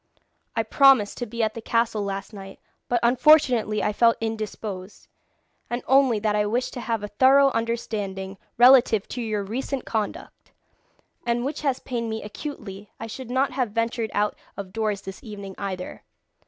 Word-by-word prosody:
I 225 - +1
promised 260 -2 +4
to 245 - -3
be 230 +1 -2
at 215 0 0
the 230 - -7
castle 230 -2 0
last 195 +2 -5
night, 195 -1 -10 0.3
but 245 - +2
unfortunately 245 -4 +4
I 210 - 0
felt 230 +2 +4
indisposed, 215 -3 -5 0.6
and 240 +1 -3
only 265 -4 +4
that 210 -1 +1
I 210 0 +1
wished 240 +4 -1
to 245 - -5
have 225 -3 -2
a - - -3
thorough 270 +5 +5
understanding 205 -5 -3 0.2
relative 245 -4 +6
to 250 - -4
your 215 -3 -2
recent 255 +5 -4
conduct, 215 -2 -5 0.7
and 240 +1 0
which 285 - -3
has 275 -4 0
pained 235 -2 -3
me 220 0 -4
acutely, 210 -4 -8
I - - -5
should 235 +2 -8
not 260 +2 +1
have 250 -5 -2
ventured 230 0 -1
out 210 +1 +1 0.2
of 195 -2 -7
doors 215 -3 -1
this 195 0 -9
evening 200 -3 -8
either. 190 -2 -5
225 Hz, 170 wpm, -24 LUFS, 205-245 Hz, 0.7 s, relative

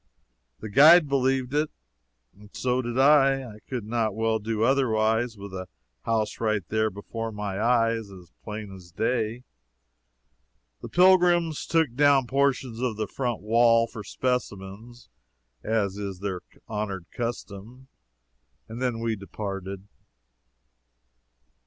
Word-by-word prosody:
The 110 - -6
guide 155 - +7
believed 135 -1 0
it, 150 +1 +1 0.6
and 105 +1 -17
so 125 0 0
did 120 0 -4
I. 135 -1 +5
I 105 -2 -12
could 120 -5 -4
not 110 -2 -1
well 110 0 0
do 110 +1 -2
otherwise, 115 -3 +1
with 100 0 -9
the 95 -1 -6 0.4
house 110 -2 -1
right 110 -5 -1
there 110 0 +1
before 115 +3 -6
my 105 -1 -4
eyes 115 -2 +1
as 90 -3 -14
plain 105 -2 -7
as 90 -2 -13
day. 115 +4 -1 1.4
The - - -8
pilgrims 175 -3 +4
took 160 -7 +1
down 140 0 +4
portions 135 -3 0
of 120 -4 -1
the 110 - -1
front 120 +1 -3
wall 115 +1 +4
for 115 -2 -9
specimens, 120 -1 -4 0.6
as 105 -3 -1
is 100 -2 -5
their 95 -2 -4 0.3
honored 105 -4 -4
custom, 120 +1 -6 0.8
and 115 +3 -8
then 120 -3 -1
we 115 -1 -1
departed. 100 0 -6
115 Hz, 125 wpm, -26 LUFS, 105-130 Hz, 1.4 s, guide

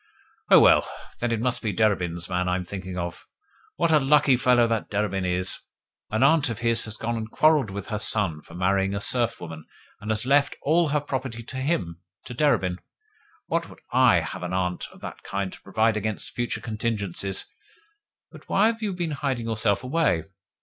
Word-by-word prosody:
"Oh, - - +9
well. - - +6 0.4
Then 120 0 -1
it 115 - 0
must 125 +1 -1
be 110 - -1
Derebin's 90 -4 0
man 90 0 -1
I 90 - +1
am 90 - -2
thinking 95 0 -6
of. 85 -1 -5 0.5
What 170 -1 +1
a 155 - +6
lucky 140 -1 +4
fellow 125 -1 +4
that 115 -2 -1
Derebin 100 -2 -1
is! 90 +1 +1 0.5
An 110 +3 +1
aunt 145 0 +4
of 115 - -4
his 115 0 +2
has 110 -1 -3
gone 115 +1 -2
and 110 -1 -4
quarrelled 150 -3 +3
with 100 0 -7
her 105 -2 -2
son 100 -7 +2
for 85 - -14
marrying 95 +2 +1
a - - -1
serf 120 +2 +1
woman, 80 -2 -8 0.4
and 105 +1 -8
has 110 +1 0
left 140 +1 +3
all 160 +2 +3
her 150 +1 +1
property 130 -4 -4
to 130 - -8
HIM, 130 - -2 0.2
to 125 - -7
Derebin. 105 -10 +1 0.7
Would 170 +1 0
that - - -14 0.2
I 125 -8 +5
had - - -6
an 90 +1 -4
aunt 90 -1 -1
of - - -17
that - - -8
kind 100 -1 -4
to - - -12
provide 110 +3 +1
against 110 0 -3
future 120 0 -2
contingencies! 105 -4 -2 0.9
But - - -15
why 200 - +3
have 225 0 -10
you 205 -3 -2
been 175 -3 -3
hiding 135 -5 -2
yourself 110 -1 0
away? 130 - +1
110 Hz, 195 wpm, -25 LUFS, 95-130 Hz, 0.9 s, Oh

